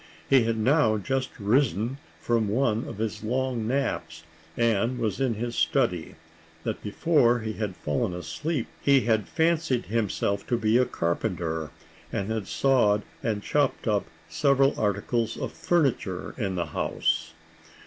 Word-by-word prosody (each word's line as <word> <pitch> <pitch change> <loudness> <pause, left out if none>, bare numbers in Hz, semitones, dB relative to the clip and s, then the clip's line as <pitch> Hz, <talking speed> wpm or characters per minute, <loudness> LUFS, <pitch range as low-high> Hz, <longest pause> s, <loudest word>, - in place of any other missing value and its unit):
He 135 -4 +5
had 115 0 0
now 110 -1 +3
just 130 +6 -1
risen 120 +3 +1 0.2
from 115 -2 +1
one 115 +1 +1
of - - -7
his 110 -1 -3
long 125 -1 -1
naps, 85 -11 -2 0.3
and 115 +1 +2
was 110 -1 -2
in 125 -4 +1
his 120 +2 -3
study; - - +1 0.5
that - - -3
before 120 0 +2
he 110 0 -3
had 105 -3 -3
fallen 120 -1 -1
asleep 90 - -3 0.2
he 140 -1 +5
had 110 -3 +1
fancied 160 -6 +1
himself 100 -2 -1
to 120 - +1
be 110 +1 +3
a 125 - +4
carpenter, 85 -4 -2 0.4
and 100 +2 -2
had 110 -3 -2
sawed 110 -7 +3 0.2
and 105 -3 -2
chopped 145 -4 0
up 105 -2 +1 0.2
several 140 -1 +3
articles 110 +3 0
of - - -4
furniture 135 - 0
in 100 -6 -2
the 85 - -1
house. - - -1
115 Hz, 145 wpm, -26 LUFS, 105-130 Hz, 0.5 s, He